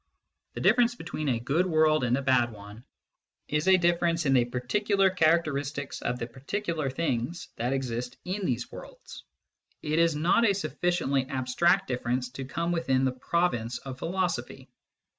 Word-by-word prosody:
The - - -4
difference 240 +1 +4
between 155 - -4
a 120 -3 +1
good 145 +10 +1
world 155 -4 +3
and 125 +1 +2
a 140 - -3
bad 125 -2 +3
one 105 +2 -12 0.6
is 150 +3 -1
a 190 0 +7
difference 170 -1 +1
in 135 - +3
the 125 -2 +4
particular 195 - +1
character 165 -3 +3
istics 140 0 -4
of 120 +1 -2
the 115 - -3
particular 155 - -3
things 135 +2 -2
that 120 +2 -1
exist 125 -2 -3
in 190 +3 -3
these 120 -1 -2
worlds: - - -11 0.6
it 155 +1 0
is 165 -2 +3
not 170 +9 +3
a 200 -4 +4
sufficiently 175 -8 -1
abstract 155 +9 +1
difference 125 0 -2
to 130 +1 -6
come 170 +5 -2
within 135 -6 +1
the 130 - +2
province 125 -4 -1
of 130 -1 -8
philosophy. 180 +2 -3
150 Hz, 160 wpm, -28 LUFS, 125-175 Hz, 0.6 s, a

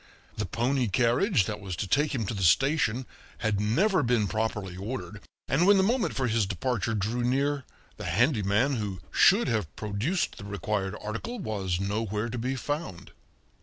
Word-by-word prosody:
The 105 - -3
pony 125 +6 0
carriage 120 - +2
that 105 -1 -4
was 95 -3 -5
to 100 - -3
take 145 +8 +2
him 115 -4 -1
to 105 - -3
the 100 - -4
station 130 - +3 0.3
had 110 -3 0
never 185 - +2
been 120 -3 +2
properly 105 -4 -2
ordered, 105 +1 -6 0.3
and 165 +7 +2
when 205 0 +7
the 190 - +4
moment 230 +3 +1
for 135 - 0
his 110 -4 +1
departure 115 +3 -1
drew 110 +5 -1
near, 140 +2 0 0.3
the - - -7
handyman 120 - +2
who 100 -4 -3
should 200 0 +5
have 105 - -1
produced 110 - -2
the 100 - -8
required 100 -1 -2
article 115 - -5
was 100 - -2
nowhere 105 +2 -2
to 120 +1 -4
be 130 +3 -1
found. 145 - -4
115 Hz, 170 wpm, -28 LUFS, 100-135 Hz, 0.3 s, when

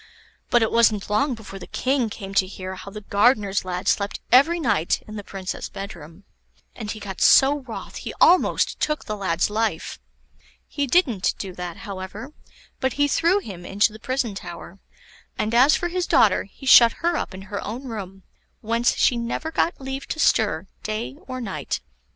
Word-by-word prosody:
But 240 -1 +4
it 220 - 0
wasn't 220 -3 +2
long 260 +5 +2
before 205 -3 -10
the 180 - -10
King 260 -3 0
came 195 -2 -8
to 195 -1 +3
hear 185 -1 -7
how 190 +1 -9
the 210 +1 -8
gardener's 205 -1 +2
lad 180 -1 -4
slept 200 0 0
every 295 +8 +5
night 210 - 0
in 215 - -8
the 205 - -6
Princess' 190 -1 -6
bedroom; 175 -2 -9 0.5
and 220 -3 -6
he 215 - -5
got 195 -2 -7
so 285 +2 +6
wroth 255 -5 -8
he - - -6
almost 360 +2 +4
took 300 0 -1
the 215 - -3
lad's 190 -1 0
life. 215 -6 -2 0.7
He 285 -1 -2
didn't 245 - +2
do 190 -2 -6
that, 175 -1 -6
however, 200 +7 -7 0.5
but 260 -1 0
he 290 0 +2
threw 335 +6 +3
him 185 - -9
into 205 +4 +1
the 220 - -11
prison 255 -2 -2
tower; 180 0 -9 0.6
and 215 +1 -1
as 260 +6 +6
for 350 - -1
his 360 0 -2
daughter, 205 -4 +4
he 205 +7 -14
shut 235 -3 +8
her 345 0 +2
up 185 - -3
in 190 - -9
her 200 0 -5
own 235 +6 -5
room, 195 -6 -7 0.4
whence 230 +2 +1
she 245 - +3
never 235 +7 -3
got 330 - 0
leave 270 0 -6
to 315 - -4
stir - - +2 0.2
day 215 +5 -4
or 255 -1 -5
night. 190 - -4
215 Hz, 185 wpm, -23 LUFS, 195-260 Hz, 0.7 s, shut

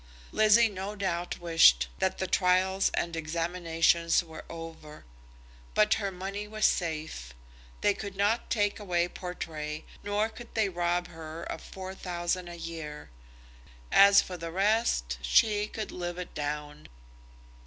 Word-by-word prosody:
Lizzie 215 +2 +5
no 200 0 -5
doubt 180 -3 -2
wished 165 - +5
that 190 - 0
the 190 - -1
trials 185 +1 +2
and 170 -1 -1
examinations 165 +1 +1
were 160 -2 -10
over; 165 -2 -9 0.7
but 215 0 +5
her 200 -2 -1
money 195 +3 -5
was 215 0 0
safe. 155 - -1 0.5
They 205 - +4
could 200 -1 -7
not 205 +4 +1
take 205 -2 +1
away 175 -4 0
Portray, 155 -4 -6 0.2
nor 205 +1 0
could 235 +1 -12
they 220 -3 +2
rob 175 0 -1
her 160 0 -8
of - - -5
four 190 0 -8
thousand 175 -1 -3
a 175 0 -8
year. 160 - -7 0.8
As 200 0 +7
for 180 - -7
the 165 0 -5
rest, 190 - +1
she 205 - +3
could 215 0 -5
live 175 -1 -4
it 180 - -6
down. 150 0 -5
175 Hz, 140 wpm, -29 LUFS, 165-200 Hz, 0.8 s, As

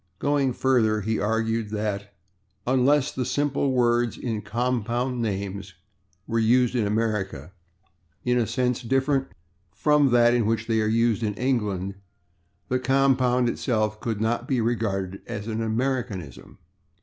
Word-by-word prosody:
Going 140 -2 +1
further, 115 -5 +2
he 110 +2 -1
argued 110 0 0
that 105 -1 -3 0.5
unless 135 +3 +3
"the 130 - -2
simple 140 +1 0
words 120 -2 +2
in 115 -4 -3
compound 120 +2 -1
names" 100 -3 -4 0.5
were 115 - -1
used 120 +2 +3
in 115 -5 +1
America 105 -7 -2 0.7
"in 125 0 +2
a 115 - 0
sense 125 +2 0
different 135 +2 +1 0.5
from 145 +6 +3
that 120 -1 +5
in 120 -3 +2
which 115 0 0
they 110 -1 +1
are 110 - +1
used 115 0 +2
in 105 -2 -1
England" 105 -7 -1 0.7
the 130 - 0
compound 130 -1 +2
itself 110 -3 -1
could 110 -3 -2
not 120 +3 -1
be 130 -3 +1
regarded 100 -5 -1
as 105 -1 -5
an 115 0 -2
Americanism. 115 - -3
115 Hz, 135 wpm, -25 LUFS, 105-125 Hz, 0.7 s, that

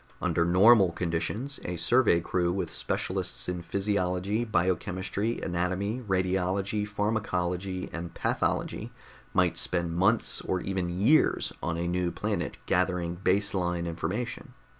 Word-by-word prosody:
Under 85 - +1
normal 95 +1 +6
conditions, 95 - -2
a 90 - -3
survey 110 -3 +4
crew 85 0 0
with 95 +2 -3
specialists - - -2
in 90 -1 -2
physiology, 95 +3 -1
biochemistry, 95 +2 -1
anatomy, 95 +6 -1
radiology, 95 +1 0
pharmacology 95 -3 -1
and 85 0 -5
pathology - - -1 0.4
might - - +2
spend 85 -2 0
months 105 +6 +2
or 95 - -1
even 95 -1 -2
years 105 - +3
on 85 - -2
a 85 +1 -1
new 90 0 0
planet - - -2
gathering 90 -1 +1
base 100 +3 +1
line 90 -2 -1
information. 110 - -4
95 Hz, 120 wpm, -28 LUFS, 85-105 Hz, 0.4 s, normal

